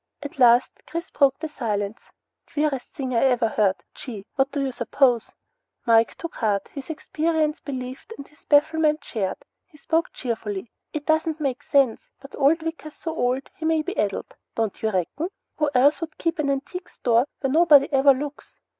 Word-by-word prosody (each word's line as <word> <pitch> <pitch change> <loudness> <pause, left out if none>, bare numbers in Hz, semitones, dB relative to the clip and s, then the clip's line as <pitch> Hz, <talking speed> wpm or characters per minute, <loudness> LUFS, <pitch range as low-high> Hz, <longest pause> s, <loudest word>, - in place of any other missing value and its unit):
At 285 -1 -8
last, 240 0 +6 0.2
Chris 335 +2 -5
broke 275 -2 +3
the 315 - -4
silence. 215 -7 -3 0.4
"Queerest 295 -4 -1
thing 260 -2 -4
I 230 - +3
ever 245 -3 +3
heard. 200 -3 +2 0.2
Gee! 215 -7 -8
Whaddaya 275 0 0
suppose?" 245 -1 +2 0.5
Mike 230 -1 +4
took 335 - -7
heart, 205 -4 0
his 275 -1 -8
experience 315 0 -1
believed 260 - -7
and 280 - -9
his 295 - -25
bafflement 305 0 +3
shared. 195 -4 -2 0.3
He 310 - -21
spoke 325 +3 0
cheerfully. 225 -4 -4 0.2
"It 295 -1 -5
doesn't 315 0 +1
make 270 -4 -2
sense, 270 -5 +2
but 275 - -11
old 300 +4 +3
Wicker's 320 -2 -6
so 325 -1 -5
old 255 0 0
he 320 - -6
may 320 -1 +2
be 370 +5 -4
addled, 200 -2 -2 0.2
don't 225 -3 -2
you 220 - +1
reckon? 215 - -2 0.3
Who 300 -1 +2
else 285 +7 +4
would 325 -1 -6
keep 330 -1 -1
an 290 -2 +1
antique 295 +7 -3
store 240 +2 +2
where 270 - 0
nobody 300 -4 +6
ever 275 +1 +6
looks? 290 +2 -7
275 Hz, 170 wpm, -24 LUFS, 240-310 Hz, 0.5 s, last